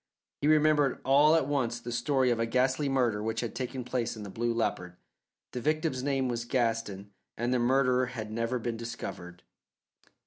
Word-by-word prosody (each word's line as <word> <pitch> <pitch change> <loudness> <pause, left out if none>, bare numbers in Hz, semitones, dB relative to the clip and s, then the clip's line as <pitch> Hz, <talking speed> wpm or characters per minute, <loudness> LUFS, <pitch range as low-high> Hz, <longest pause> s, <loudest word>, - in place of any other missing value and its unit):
He 145 - +1
remembered 150 -2 +3
all 145 +4 +5
at 160 - +2
once 120 -5 -1
the 120 0 -7
story 130 +1 +1
of 115 - 0
a 115 - 0
ghastly 130 +4 +1
murder 120 -6 +1
which 110 +1 -2
had 120 - -4
taken 130 0 -4
place 120 -2 -2
in 105 - -7
the 100 - -8
Blue 120 +3 -1
Leopard. 90 -6 -2 0.6
The 125 - -4
victim's 155 -1 0
name 135 -1 0
was 120 -1 -2
Gaston 115 -5 -1 0.3
and 120 +2 0
the 125 - +2
murderer 125 0 +2
had 110 -4 -6
never 115 +3 -1
been 115 -1 -3
discovered. 90 -6 -7
125 Hz, 180 wpm, -29 LUFS, 115-135 Hz, 0.6 s, all